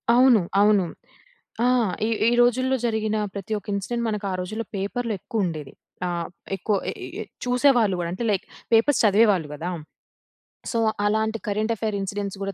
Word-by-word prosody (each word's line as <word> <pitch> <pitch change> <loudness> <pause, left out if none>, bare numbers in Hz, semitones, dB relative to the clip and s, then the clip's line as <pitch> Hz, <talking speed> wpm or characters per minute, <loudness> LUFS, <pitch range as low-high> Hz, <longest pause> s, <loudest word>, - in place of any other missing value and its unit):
అవును. 250 -5 +6 0.2
అవును. 205 -3 +4 0.8
ఆ! - - +4 0.4
ఈ - - -1 0.2
ఈ - - +1
రోజుల్లో 255 +2 +3
జరిగిన 220 -1 0 0.2
ప్రతి 200 +2 -4
ఒక - - -26
ఇన్సిడెంట్, 235 +4 -2
మనకా 205 -2 -2
రోజుల్లో 215 +5 -4
పేపర్లో 225 +4 -2
ఎక్కువుండేది. 170 -11 -3 0.3
ఆహ్, 170 -1 -2 0.3
ఎక్కువ 205 +2 0 0.2
ఎ - - -6
ఎ - - -9
ఎ - - -3 0.2
చూసేవాళ్ళు 245 -6 +3
కూడా. 170 -1 -2
అంటే 235 - -4
లైక్ 195 -1 -1 0.3
పేపర్స్ 230 +4 +4
చదివేవాళ్ళు 200 -6 +4
కదా! 165 +5 -4 1.0
సో, 230 - -1 0.3
అలాంటి 220 +1 +1
కరెంట్ 215 +3 0
అఫైర్ 215 -1 -2
ఇన్సిడెంట్స్ 200 0 -4
కూడా 195 0 -3
215 Hz, 155 wpm, -24 LUFS, 195-230 Hz, 1.0 s, అవును